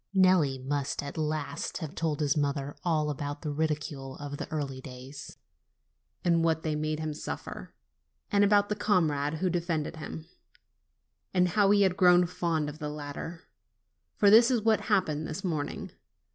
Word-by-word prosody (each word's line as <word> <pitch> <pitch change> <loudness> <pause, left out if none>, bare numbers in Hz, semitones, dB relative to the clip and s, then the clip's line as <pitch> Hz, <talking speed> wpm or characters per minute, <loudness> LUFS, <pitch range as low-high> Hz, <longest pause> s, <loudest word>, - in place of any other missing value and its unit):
Nelli 185 -8 +4
must 140 +2 -2
at 140 - -6
last 155 -2 -2
have 160 -3 -6
told 160 -4 -1
his 145 -2 +2
mother 145 -1 -1
all 155 -3 +1
about 145 +1 -5
the 150 - -2
ridicule 145 -3 -3
of 145 0 -6
the - - -5
early 140 -4 -3
days, 130 +3 -10 0.9
and 170 -1 +3
what 160 -1 +1
they 155 - 0
made 155 0 -2
him 155 -1 -3
suffer; 150 - -7 0.6
and 205 0 +4
about 205 0 +4
the 210 - 0
comrade 155 -8 +1
who 185 +4 0
defended 165 -2 -2
him, 155 +1 -7 1.1
and 180 -1 +4
how 205 +1 +3
he 205 0 +5
had 185 -1 +2
grown 180 -1 +6
fond 170 -3 -1
of 150 +1 -7
the 150 -2 -3
latter; 150 +3 -6 0.7
for 200 -1 +5
this 230 +3 +8
is 240 -5 +1
what 220 -1 +3
happened 160 -7 +1
this 155 - -5
morning. 155 -6 -3
155 Hz, 165 wpm, -29 LUFS, 145-180 Hz, 1.1 s, this